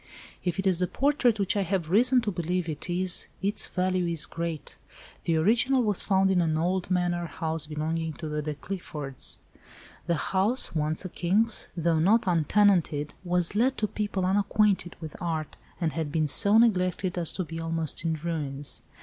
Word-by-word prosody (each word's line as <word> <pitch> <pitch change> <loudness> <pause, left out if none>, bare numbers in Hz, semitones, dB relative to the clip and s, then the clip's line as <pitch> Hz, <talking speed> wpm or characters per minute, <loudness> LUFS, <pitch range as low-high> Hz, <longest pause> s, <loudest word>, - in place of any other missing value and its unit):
"If 180 0 -2
it 195 - -1
is 185 -3 +3
the 180 - +1
portrait 265 -4 +1
which 200 0 0
I 200 - +1
have 180 -3 -2
reason 250 +5 +5
to 215 -3 -2
believe 175 0 -2
it 155 +2 -5
is 180 +1 0
its 200 +2 0
value 185 -1 0
is 165 -2 0
great. 165 -2 -5 0.5
The 165 - +1
original 240 +9 +3
was 210 -4 +1
found 190 0 +2
in 180 -2 +3
an 160 -2 0
old 180 +3 -1
manor 175 -1 0
house 160 0 -2
belonging 160 +1 -3
to 155 - -7
the 150 0 -2
De 150 0 -4
Cliffords. 150 -6 -2 0.7
The 170 - +2
house—once 180 - 0
a - - -4
king's—though 175 -4 +1
not 205 +8 +3
untenanted, 170 -3 +2
was 180 -1 +1
let 250 +6 +1
to 215 - 0
people 205 -2 -2
unacquainted 200 -1 +1
with 160 -2 -8
art, 160 -3 -3 0.2
and 165 -3 -1
had 160 -3 -3
been 155 0 +1
so 200 +8 +5
neglected 185 -5 +2
as 170 - +2
to 185 - -2
be 165 0 -7
almost 165 -2 -2
in 165 -1 0
ruins. 145 -3 -2
175 Hz, 175 wpm, -27 LUFS, 160-195 Hz, 0.7 s, reason